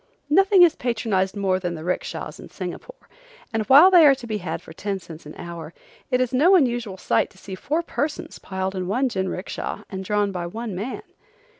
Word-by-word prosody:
Nothing 385 +2 +6
is 335 -2 +5
patronized 215 -6 -1
more 190 -2 0
than 175 -2 -3
the 155 - -8
'rickshas 180 +2 -4
in - - -11
Singapore, - - -8 0.5
and 225 - +1
while 290 +8 +8
they 350 -3 +8
are 275 - +6
to 260 -2 -10
be 215 -2 -3
had 175 -3 -4
for 160 - -13
ten 200 +3 -3
cents 165 -4 -12
an 150 - -10
hour 170 -1 -8 0.3
it 250 -1 +2
is 255 -1 0
no 330 +9 +5
unusual 240 - +1
sight - - +1
to - - -22
see 190 0 -9
four 300 - -2
persons 295 -2 -4
piled 190 0 -4
in 185 -2 -3
one 255 +7 +1
jinricksha 190 -2 -4
and 190 -1 -5
drawn 205 +1 0
by 175 -2 -4
one 225 +3 -5
man. 205 +8 -5
210 Hz, 200 wpm, -23 LUFS, 185-265 Hz, 0.5 s, while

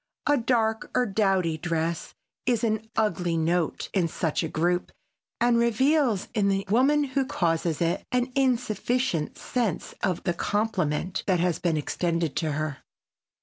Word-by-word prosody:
A 290 - +4
dark 225 -3 +1
or 250 - +3
dowdy 195 -6 +1
dress 165 0 -2 0.3
is 240 -3 +2
an 220 -1 -1
ugly 175 -6 +1
note 165 +1 0
in 185 -4 +2
such 160 -1 -1
a 165 - -1
group 175 +3 0 0.5
and 235 0 +3
reveals 235 -1 +2
in 205 -3 +2
the 195 0 0
woman 280 +6 +4
who 275 0 0
causes 170 - 0
it 170 +1 0
an 250 +1 0
insufficient 245 - 0
sense 230 -9 -2
of 185 -4 -1
the 175 - 0
compliment 185 -4 -1
that 185 -3 +3
has 175 -2 +1
been 165 -3 +1
extended 165 +1 -1
to 155 -3 0
her. 155 -1 -3
195 Hz, 145 wpm, -26 LUFS, 170-240 Hz, 0.5 s, A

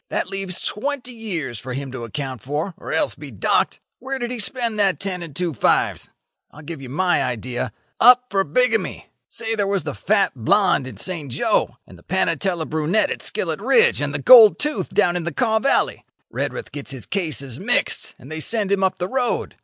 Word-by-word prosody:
That - - -2
leaves 195 -2 -2
twenty 255 +3 -3
years 170 - -4
for 130 0 -6
him 135 0 -5
to 130 -2 -6
account 130 0 -5
for, 150 +7 -3
or - - -8
else - - +1
be - - -9
docked. - - 0 0.2
Where 270 +1 -4
did 240 -1 -3
he 250 - -4
spend 225 +1 -2
that 190 -7 +2
ten 185 -2 -3
and 165 -5 -8
two 175 -1 -1
fives? 115 - +1 0.4
I'll 150 - -14
give 155 -1 -7
you 130 - -8
my 175 +6 +1
idea. 120 0 -3 0.3
Up 250 +1 +7
for 195 -1 +2
bigamy. - - 0 0.2
Say 225 -1 -3
there 205 -3 0
was 200 -1 0
the - - -4
fat 205 -1 +1
blonde 140 - +2
in 130 - -9
Saint 165 -8 -4
Jo, - - +1
and 90 - -15
the - - -20
panatela 175 -2 0
brunette 160 +8 +1
at - - -4
Skillet - - -2
Ridge, 470 0 +4
and - - 0
the - - -1
gold 475 -4 +8
tooth 300 0 -2
down 180 -4 +2
in 175 - -2
the 170 - -2
Kaw 220 - +1
valley. 275 +4 +1 0.3
Redruth - - -4
gets 145 - -7
his 130 -4 -6
cases 150 - -3
mixed, - - 0
and 135 - -13
they 160 - -4
send 210 +3 +1
him 195 -1 +2
up 190 - +1
the 180 - -2
road. 255 +2 -1
185 Hz, 205 wpm, -21 LUFS, 145-225 Hz, 0.4 s, gold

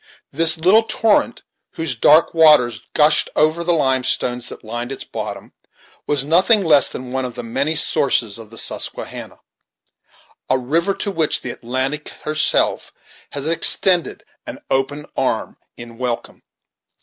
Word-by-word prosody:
This 160 +2 +4
little 185 +7 +4
torrent, 225 -1 0 0.3
whose 160 -4 -2
dark 150 +8 +3
waters 150 -9 +4
gushed 150 0 +3
over 155 +3 +1
the 175 - 0
limestones 130 -4 0
that - - -11
lined 120 +3 -6
its 135 - -6
bottom, - - -8 0.5
was 140 -2 +1
nothing 185 +7 +3
less 150 -3 +4
than 125 -1 -8
one 130 0 -3
of 125 -2 -7
the 120 - -7
many 140 +7 -1
sources 115 -8 +2
of 110 -2 -12
the 115 - -13
Susquehanna; - - -2 1.1
a 130 - +2
river 165 +10 -1
to 200 - -4
which 160 -5 0
the 125 - -3
Atlantic 130 +6 -4
herself 155 0 0 0.4
has 145 +1 -3
extended 170 0 +3 0.2
an - - -7 0.6
arm - - -3 0.2
in 120 -1 -12
welcome. 125 -2 -5
145 Hz, 135 wpm, -18 LUFS, 125-165 Hz, 1.1 s, This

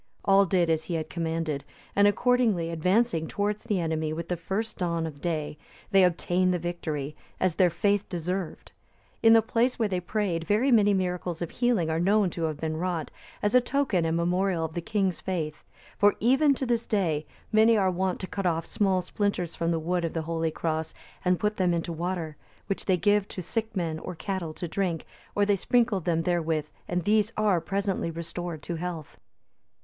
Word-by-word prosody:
All 195 0 +5
did 175 -1 +2
as 160 0 0
he 175 - -3
had 160 -1 -3
commanded, 165 -4 -2 0.3
and 205 0 +6
accordingly 210 -5 +2
advancing 180 +1 +1
towards 205 +1 -2
the 205 -3 0
enemy 160 -2 -1
with 170 +2 -5
the 180 - +1
first 195 +7 -4
dawn 170 -2 0
of 145 -3 -7
day, 155 -3 -2 0.3
they 195 -1 +6
obtained 180 +1 +2
the 180 - +1
victory, 155 -4 -4 0.2
as 185 -2 +2
their 180 +2 +4
faith 200 +4 0
deserved. 180 +1 -4 0.5
In 225 0 +7
the 225 -1 +6
place 240 +2 +1
where 225 - +1
they 185 -3 -1
prayed 180 -3 -1
very 230 +7 +3
many 210 -3 +5
miracles 180 -3 -1
of 170 - -4
healing 230 -10 +1
are 160 - 0
known 195 +1 +3
to 165 0 -2
have 155 -2 -3
been 155 0 -2
wrought, 170 -2 -2 0.3
as 205 +2 +1
a 250 - +7
token 250 -8 +1
and 165 0 +1
memorial 175 0 +1
of 160 - -6
the 175 - -3
king's 195 -2 -1
faith; 160 -5 -3 0.4
for 205 0 +5
even 270 +5 +4
to 265 - -2
this 235 -2 0
day, 160 -8 0 0.2
many 220 +1 +5
are 190 -2 +3
wont 185 +1 -1
to - - -2
cut 195 0 -2
off 165 -1 0
small 190 -3 +1
splinters 180 -3 -1
from 165 - -1
the 170 - +1
wood 175 +2 -1
of 165 - -2
the 165 - -2
holy 165 0 -1
cross, 160 0 -3 0.3
and 180 -1 +2
put 210 0 0
them 180 -2 +2
into 170 0 -2
water, 165 -2 -3 0.3
which 195 - -3
they 185 -2 +3
give 205 +2 +2
to 185 - -6
sick 220 +4 -3
men 165 -4 -1
or 180 - -6
cattle 185 -2 -3
to 175 - -4
drink, 175 -2 -2 0.3
or 205 - +3
they 205 0 +3
sprinkle 230 +1 +2
them 165 -1 0
therewith, 165 -3 0 0.2
and 180 0 -1
these 210 +3 +2
are 205 -5 +3
presently 195 0 -1
restored 170 -1 -5
to 170 - -4
health. 170 -3 -6
180 Hz, 200 wpm, -27 LUFS, 165-205 Hz, 0.5 s, In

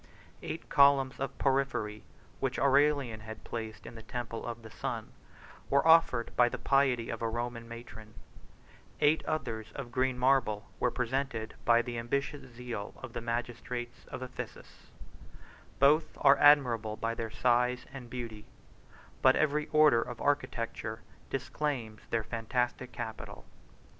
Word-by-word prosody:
Eight 160 - -6
columns 140 -2 +4
of 135 - -4
porphyry, 130 -6 0 0.4
which - - -1
Aurelian 140 -4 +3
had 110 +1 -9
placed 110 -2 -6
in 115 - -8
the 115 - -9
temple 115 0 -5
of 120 -1 -6
the 110 - -11
sun, - - -4 0.6
were 140 +3 +3
offered 160 -8 +5
by 120 -1 +5
the - - -4
piety 135 -4 +2
of 115 - -5
a 115 - 0
Roman 120 0 -4
matron; 110 -2 -10 0.8
eight 150 +1 +3
others 115 -7 -3
of 130 -4 -6
green 130 0 +1
marble 125 -5 +2
were 125 - +2
presented 125 -2 -2
by 120 0 +5
the 120 -1 -4
ambitious 140 +3 -3
zeal 115 -3 -6
of 130 -3 -9
the - - -4
magistrates 120 +1 -4
of 130 - -7
Ephesus: 130 0 -9 0.9
both 150 +4 +4
are 140 -1 +6
admirable 120 -7 +5
by 115 0 -1
their 115 -1 -4
size 125 +2 +1
and 125 -3 -8
beauty, 115 -4 -6 0.7
but - - +6
every 150 0 +1
order 150 -6 +5
of 120 -1 -6
architecture 115 -5 -2 0.3
disclaims 130 -5 -3
their 115 -1 0
fantastic 120 +3 -2
capital. - - -7
120 Hz, 140 wpm, -31 LUFS, 115-135 Hz, 0.9 s, are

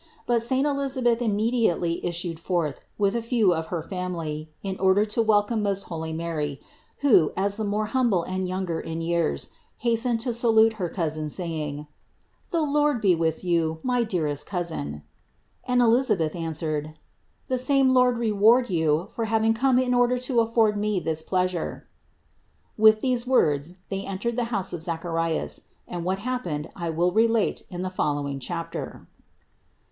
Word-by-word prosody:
But 235 -1 +2
saint 260 +4 +1
Elisa 275 -2 -1
beth 240 0 +3
immediately 215 -6 +1
issued 170 -1 -3
forth 170 -5 -2 0.2
with 200 +1 +1
a 235 - 0
few 230 -5 +2
of 160 -1 -3
her 170 -3 -3
family, 165 -4 -4
in 190 -1 -4
order 190 +2 +4
to 215 +2 0
welcome 215 0 +2
most 200 -1 -1
holy 160 -1 -5
Mary, 160 -4 -3 0.4
who, 220 - +5
as 200 +1 +1
the 220 - -3
more 210 +1 0
humble 220 -6 +1
and 185 +1 -3
younger 180 -3 -2
in 165 0 -5
years, 165 - -1 0.3
hastened 235 0 +1
to 245 0 -1
salute 225 -1 +4
her 175 - -1
cousin, 155 -3 -2
saying: 150 -3 -4 0.6
"The 335 -5 +1
Lord 295 -2 +2
be 195 -4 +4
with 165 0 -1
you, 165 -3 +1
my 250 -1 +1
dearest 150 -9 -2
cousin," 75 - -4 0.6
and 250 -1 +3
Elisabeth 225 -10 +2
answered: 155 -2 -3 0.5
"The 255 -1 0
same 265 0 +4
Lord 250 -1 +4
re 230 -2 0
ward 225 +3 +4
you 160 +2 +1
for 230 - -2
having 220 0 +2
come 255 +2 +2
in 255 -1 +2
order 245 0 +3
to 250 -1 0
afford 225 -2 +2
me 210 -2 0
this 160 -2 -1
pleasure." 185 0 -2 0.9
With 215 0 +6
these 250 -2 0
words 155 - +2
they 195 0 -4
entered 205 +5 -3
the 245 -1 0
house 200 -6 -2
of 170 - -4
Zacharias 165 -1 -2 0.3
and 175 -1 -5
what 185 +2 0
happened 195 -10 -3
I 170 -1 -3
will 170 +3 +1
relate 225 +2 +2
in 180 -1 -5
the 185 - -3
follow 145 -5 -1
ing 140 -1 -4
chapter. 165 +6 -5
195 Hz, 165 wpm, -25 LUFS, 165-235 Hz, 0.9 s, With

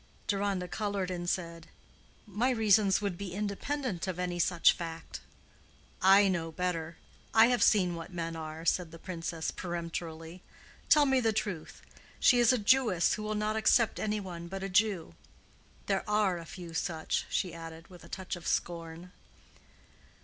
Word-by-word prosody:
Deronda 200 -3 -1
colored 200 -2 -2
and 175 -1 -3
said, 170 -3 -3 0.6
"My 215 +5 0
reasons 215 -5 +3
would 200 -4 -3
be 195 -3 -5
independent 210 - -3
of 185 -2 -3
any 180 -1 -2
such 170 0 +4
fact." 165 - -7 0.8
"I 195 +2 +7
know 170 -4 -1
better. 170 -1 -3 0.4
I 225 +1 +7
have 245 -1 +1
seen 185 -5 +4
what 165 +2 -7
men 165 -2 -4
are," 160 0 -7
said 175 0 +1
the 165 - -11
Princess, 165 -2 -4
peremptorily. 170 -1 -6 0.5
"Tell 300 -2 +6
me 265 -1 +3
the 225 -3 +2
truth. 200 -6 -4 0.4
She 245 - +5
is 240 0 +6
a 255 - +2
Jewess 215 -5 +3
who - - -3
will 215 0 -2
not 210 +1 -1
accept 220 +1 +3
any 215 0 -1
one 175 -3 -7
but 195 +2 -6
a 195 - -3
Jew. 195 - +1 0.7
There 195 -1 0
are 205 -4 +2
a 165 - -9
few 170 0 -9
such," 160 -1 -2
she 180 -4 -1
added, 165 0 -9
with 180 -2 -14
a - - -14
touch 190 0 -5
of 175 - -9
scorn. 170 +1 -3
185 Hz, 165 wpm, -30 LUFS, 170-210 Hz, 0.8 s, I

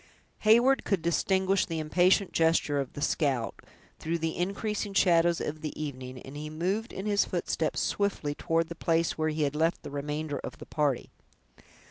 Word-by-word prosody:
Heyward 240 +5 +5
could 190 -5 0
distinguish 190 +3 +2
the 165 - -3
impatient 175 +5 +3
gesture 160 -3 +2
of 135 - -4
the 145 - -4
scout, 135 -7 0 0.4
through 165 +2 -1
the 165 0 -2
increasing 200 +2 -2
shadows 170 -2 +4
of 155 +1 -4
the 155 - -5
evening, 130 -4 -5
and 135 - -10
he 150 +1 -5
moved 185 +9 -2
in 190 - -6
his 205 -1 +3
footsteps, - - -1
swiftly, 200 -8 -1
toward 165 +2 0
the - - -4
place 165 0 +1
where 155 0 0
he 155 0 -1
had 145 0 -1
left 165 +3 +1
the - - -7
remainder 145 +1 -3
of - - -7
the - - -10
party. 145 -4 -1
165 Hz, 175 wpm, -29 LUFS, 150-190 Hz, 0.4 s, Heyward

